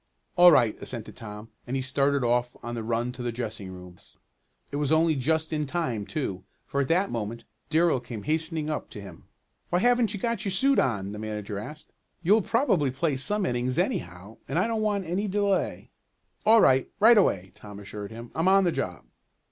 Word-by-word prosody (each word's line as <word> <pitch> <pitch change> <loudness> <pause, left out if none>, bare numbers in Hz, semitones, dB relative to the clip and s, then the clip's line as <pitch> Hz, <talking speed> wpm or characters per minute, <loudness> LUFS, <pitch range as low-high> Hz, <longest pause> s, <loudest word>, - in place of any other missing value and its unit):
"All 175 0 +8
right," 120 -8 +4
assented 115 -3 -7
Tom, 105 0 -9 0.2
and 125 - -2
he 135 - 0
started 140 +1 +1
off 120 +1 0
on 120 0 -4
a 115 - -3
run 115 +2 -1
to 125 0 -9
the 120 -1 -2
dressing 110 -4 -5
rooms. 90 -1 -13 0.5
It 145 - -3
was 145 0 0
only 160 0 +4
just 160 +4 0
in 150 -1 -1
time, 130 -11 -2
too, 100 - -3 0.2
for 140 - -1
at 135 - -1
that 185 +4 +2
moment 115 0 -4 0.3
Darrell 160 -3 +3
came 115 -4 -8
hastening 160 0 -1
up 155 -1 -3
to - - -9
him. 95 -5 -11 0.4
"Why 175 - +2
haven't 240 0 +2
you - - -5
got 230 -1 -1
your 195 -4 -2
suit 275 +7 +3
on?" 100 -6 0
the 105 - -7
manager 105 -2 -4
asked. 150 +9 -9 0.3
"You'll 210 +6 +5
probably 200 - +2
play 140 +3 -1
some 205 +9 -1
innings 125 -2 -1
anyhow, 90 +5 -3
and - - -2
I 185 - +3
don't 225 -1 -1
want 205 -3 0
any 185 +6 -1
delay." 200 -1 -1 0.6
"All 225 0 +7
right 130 0 +4
right 225 +3 +7
away," 95 - +1
Tom 105 -1 -11
assured 100 0 -7
him. 115 +1 -10
"I'm 165 +3 0
on 195 +1 +5
the 175 - +2
job." - - -4
135 Hz, 200 wpm, -27 LUFS, 110-180 Hz, 0.6 s, All